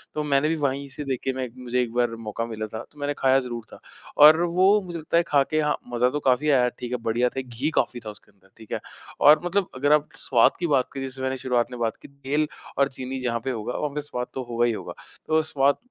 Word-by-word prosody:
तो 150 - -1
मैंने 140 0 +2
भी 165 - +1
वहीं 140 -2 -1
से 150 +3 -7
देख 130 -2 -2
के 135 - 0
मैं 130 0 -3
एक 120 - -11
मुझे 125 0 -1
एक 120 - -2
बार 120 -1 +1
मौका 115 +2 -3
मिला 110 -2 -5
था 110 +2 -7
तो 150 - -19
मैंने 145 0 -1
खाया 135 0 +4
ज़रूर 120 -3 -5
था - - -12 0.4
और 155 +2 +9
वो 185 +4 +4
मुझे 175 -2 -6
लगता 160 +2 0
है 170 - +4
खा 140 -2 +4
के 155 - +2
हाँ, 150 -1 +1 0.2
मज़ा 125 +1 +3
तो 150 - -2
काफ़ी 135 +2 +2
आया 125 -3 +4
ठीक 120 -1 -5
है? 125 - 0
बढ़िया 120 +1 0
था, 135 - -4
घी 130 +3 -3
काफ़ी 120 - +1
था 110 - -4
उसके 105 - -14
अंदर 95 -1 -28
ठीक 110 -2 -15
है? - - -1 0.4
और 150 +1 +7
मतलब 190 +1 0
अगर 145 +3 +1
आप 150 0 +2
स्वाद 120 -4 +3
की 175 - 0
बात 135 -4 +2
की, 135 - -5
जैसे 130 0 -5
मैंने 130 0 -1
शुरुआत 125 -1 0
में 125 - -7
बात 115 -1 -1
की - - -11
तेल 140 +2 -2 0.3
और 140 0 +4
चीनी 130 0 -6
जहाँ 120 -2 -1
पे 135 - -1
होगा, 115 +1 -4
वहाँ 145 -2 -2
पे 150 - -1
स्वाद 125 -4 -5
तो 130 - -4
होगा 120 0 +1
ही 120 - +2
होगा। - - -6 0.3
तो 160 0 +3
स्वाद 140 -2 +2
130 Hz, 270 wpm, -25 LUFS, 120-150 Hz, 0.4 s, और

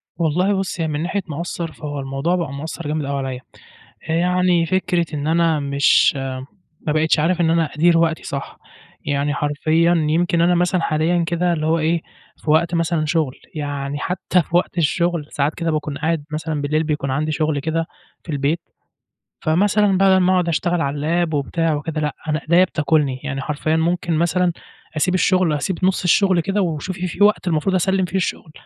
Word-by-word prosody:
والله 180 +5 +1
بُصي، 190 -3 -2
هي - - 0
من 150 -1 -2
ناحية 195 +3 -1
مأثِّر، 165 +1 -4
فهو 145 -2 -6
الموضوع 135 +6 -1
بقى 165 -6 -3
مأثِّر 160 +2 -6
جامد 150 0 -2
أوي 140 0 -2
عليَّ. 125 -1 -5 0.7
آآ، - - +1
يعني 180 0 +2
فكرة 180 0 0
إن 145 0 -3
أنا 165 -1 +2
مش 140 0 +3 0.7
ما 150 - +2
بقِيتِش 155 0 +2
عارِف 175 +3 +1
إن 165 - +3
أنا 165 0 +3
أديِّر 165 +2 +4
وقتي 165 -1 +1
صح، 140 0 -6 0.5
يعني 145 0 0
حرفيًا 155 +4 +1 0.2
يمكن 170 +1 +2
أنا 175 +1 +4
مثلًا 180 +1 +1
حاليًا 165 +2 +1
كده، 175 +1 +1
اللي 155 -1 -2
هو 165 +1 +2
إيه، 165 +1 +1 0.4
في 150 - -2
وقت 170 +2 +2
مثلًا 165 -1 0
شغل، 155 -4 0 0.2
يعني 145 -1 -3
حتى 180 +2 0
في 170 +1 -5
وقت 175 - -1
الشغل 170 0 +1
ساعات 145 +2 -1
كده، 165 -1 -1
باكون 150 -2 -3
قاعد 160 0 -1
مثلًا 155 -1 -3
بالليل، 150 +2 0
بيكون 150 -3 -2
عندي 155 +4 -1
شغل 155 -1 0
كده 160 +3 -1 0.4
في 165 - -7
البيت. 145 +3 0 0.8
فمثلًا 195 +4 +2
بدَل 195 -1 +5
ما 185 0 +3
أقعُد 180 -2 +2
أشتغَل 170 +1 0
على 150 +5 0
الlap 160 - -5
وبتاع 160 +3 0
وكده، 155 +1 -3
لأ، 150 -2 -2
أنا 155 0 0
إيديَّا 170 +5 +4
بتاكُلني، 150 -6 0
يعني 140 -2 -3
حرفيًا 150 +3 -1
ممكن 170 +1 0
مثلًا 175 +2 +1 0.4
أسيب 180 +4 +1
الشغل، 185 -3 +2
أسيب 160 +5 -2
نُصّ 190 0 +1
الشغل 185 0 +4
كده، 195 +5 0
وشوفي 175 +2 -3
في 185 +3 +1
وقت 210 -1 +2
المفروض 165 +3 0
أسلِّم 190 +1 +2
فيه 185 +2 -3
الشغل. 180 -4 -3
165 Hz, 185 wpm, -20 LUFS, 150-175 Hz, 0.8 s, بدَل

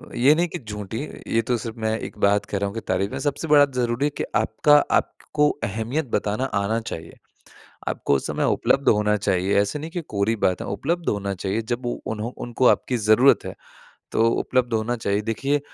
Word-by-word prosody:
ये 140 +5 +5
नहीं 175 +2 +1
कि - - -6
झूठी 105 -1 -6 0.3
ये 115 - +2
तो 120 -1 +2
सिर्फ़ 115 0 -7
मैं 110 0 0
एक - - -8
बात 100 0 +3
कह 100 - -3
रहा 100 +1 -1
हूँ 100 - -6
कि 115 - -3
तारीफ़ें 95 +2 -1
सबसे 145 +3 -1
बड़ा 145 -1 +7
ज़रूरी 120 +3 0
है - - +2
कि - - -1
आपका 150 -2 +4 0.2
आपको 150 0 -1
अहमियत 115 +8 -2
बताना 105 +5 -1 0.2
आना 110 +3 0
चाहिए। 85 -7 -8 0.7
आपको - - 0
उस - - -4
समय - - -1
उपलब्ध 135 0 +2
होना 105 0 +3
चाहिए 95 -1 0
ऐसा 105 +9 -1
नहीं 160 +3 -6
कि 175 - -3
कोरी 100 +3 +1
बात 90 - +2
है - - -5
उपलब्ध 165 - -2
होना 100 -1 -1
चाहिए। 100 +5 -2
जब 120 +1 -3
उ 120 - -1 0.2
उन्हों 110 +3 -4
उनको 120 +1 0
आपकी 125 - +2
ज़रूरत 110 +5 +4
है, - - -6 0.6
तो 115 +1 +3
उपलब्ध 125 -1 0
होना 115 +2 0
चाहिए। 100 -2 0
देखिए 135 +7 0
115 Hz, 200 wpm, -23 LUFS, 105-135 Hz, 0.7 s, बड़ा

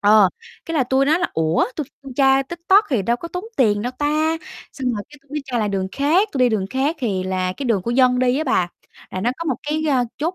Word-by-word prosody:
Ờ, 205 -2 +6 0.4
cái 330 - -4
là 270 - +3
tui 265 +2 +2
nói 315 +4 +3
là 355 - +1
"Ủa 160 +1 +2
tui 305 - -3 0.3
tra 270 -1 +4
TikTok 345 +8 +3
thì 240 -7 +1
đâu 235 +5 +1
có 335 +7 -8
tốn 360 +3 -5
tiền 210 -5 +3
đâu 245 +2 -3
ta?" 310 +2 +1 0.4
Xong 255 -3 -2
rồi 210 -3 -3
cái 295 0 -15
tui 275 - -33
mới 300 0 -3
tra 255 -3 -2
lại 215 -2 0
đường 190 -1 -2
khác, 330 +9 +2
tui 275 - -3
đi 250 -1 +5
đường 210 -4 -1
khác 275 +5 0
thì 205 -9 -1
là, 185 0 -1
cái, 275 - -6
đường 215 -6 +1
của 230 - -2
dân 250 0 +4
đi 255 +1 +2
á 310 - -1
bà, 220 - +1 0.4
là 185 - -4
nó 230 +5 +1
có 335 - -4
một 275 -7 0
cái, 305 +1 -2
ờ, 255 -3 +3
chốt 325 +5 -1
260 Hz, 265 wpm, -21 LUFS, 215-300 Hz, 0.4 s, Ờ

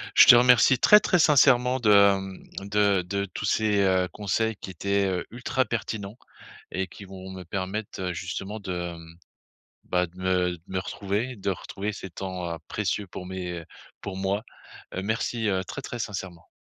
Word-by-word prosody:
Je - - +9
te 125 - +11
remercie 125 +1 +6
très, 210 - +8
très 180 - +2
sincèrement 130 -4 +5
de, 115 -4 +2 0.3
mmh, 95 +1 -9
de 100 -2 +3
de 100 +2 -2
tous 105 - -4
ces, 105 -1 +2
heu, 95 -1 +2
conseils 110 +2 -1
qui 95 - -8
étaient, 100 +3 0
heu, 90 -2 -2
ultra 125 +2 -1
pertinents 110 -2 -4 0.5
et 95 0 -2
qui 100 - -12
vont 95 0 -10
me 95 -1 -8
permettre, 95 +3 -4
heu, 90 -1 -2
justement 95 +4 -5
de, 90 -3 -4
mmh, 80 0 -14 0.7
bah, 90 0 +1
de 90 - -21
me 90 -1 +1
de - - -27
me 95 - -2
retrouver, 105 +6 -3
de 100 - -2
retrouver 100 +2 -5
ces 95 -1 -8
temps, 90 -2 -4
heu, 85 - -5
précieux 100 -1 -2
pour 90 - -8
mes 90 -2 -5 0.4
pour 95 -2 -6
moi. 100 +2 -1 0.5
Heu, 95 - -2
merci, 110 +1 -1
heu, 95 -1 0
très, 140 - -6
très 120 - -6
sincèrement. 95 -5 -6
95 Hz, 180 wpm, -26 LUFS, 95-110 Hz, 0.7 s, te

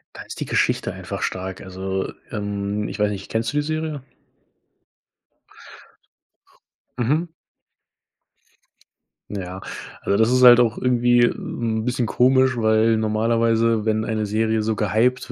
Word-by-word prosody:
Da - - -8
ist - - -9
die - - -3
Geschichte - - 0
einfach - - -7
stark, 95 0 -4
also, 95 +1 -4 0.2
ähm, 105 -1 -3
ich - - -6
weiß 105 0 +2
nicht, 100 -1 -7
kennst 115 +1 -1
du 145 - -3
die 150 - +2
Serie? 155 -1 -3 3.0
Mhm. 150 +8 0 2.0
Ja, 95 -2 -6 0.4
also 100 - 0
das 110 +1 +3
ist 130 0 +3
halt 120 -1 +9
auch 120 -1 +2
irgendwie, 120 -1 +3
'n 110 -2 -2
bisschen 125 0 -1
komisch, 130 +2 +3
weil 110 0 +3
normalerweise, 115 +1 +1
wenn 110 0 0
eine 110 -2 -2
Serie 110 +1 0
so 110 +1 -1
gehypt 115 +5 0
110 Hz, 130 wpm, -22 LUFS, 105-125 Hz, 3.0 s, halt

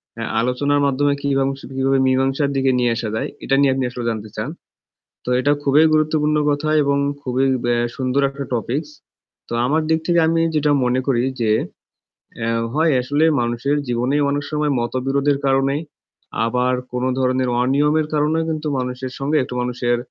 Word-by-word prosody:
অ্যা - - -4 0.2
আলোচনার 140 +4 +1
মাধ্যমে 140 +1 +2
কিবাং 135 -1 +1 0.3
কীভাবে 135 0 +2
মীমাংসার 135 +2 +1
দিকে 135 0 +2
নিয়ে 120 -1 +2
আসা 115 -1 -3
যায়, - - -2 0.2
এটা 135 - +1
নিয়ে 140 -2 +4
আপনি 135 0 -1
আসলে 120 -1 -6
জানতে 110 -1 -4
চান। - - -3 0.8
তো - - -8
এটা 145 +3 +2
খুবই 145 +2 +4
গুরুত্বপূর্ণ 155 0 +2
কথা 145 +1 -1
এবং 140 0 +1 0.2
খুবই 130 0 0 0.2
ব্যা 120 0 +2 0.2
সুন্দর 130 +1 0
একটা 140 0 -6
topics. 135 +6 -2 0.6
তো - - -8
আমার 155 +4 +1
দিক 160 0 +2
থেকে 170 -1 +3
আমি 165 0 +2
যেটা 150 -1 +2
মনে 125 +1 +1
করি 125 -4 +2 0.2
যে, 110 -2 +1 0.9
অ্যা 115 -1 -2 0.2
হয় 160 +2 +2
আসলে 145 +5 +1 0.2
মানুষের 120 +4 -1
জীবনেই 125 +4 0
অনেক 145 0 -1
সময় 150 -1 0
মতবিরোধের 135 +4 0
কারণেই 135 +2 +1 0.6
আবার 125 +2 +1 0.2
কোনো 125 +1 -1
ধরনের 130 0 +1
অনিয়মের 150 +4 +2
কারণেও 155 +2 +1
কিন্তু 155 -1 -3
মানুষের 125 0 -4
সঙ্গে 145 +3 0
একটু 125 - -7
মানুষের 120 0 -1
135 Hz, 165 wpm, -20 LUFS, 125-145 Hz, 0.9 s, নিয়ে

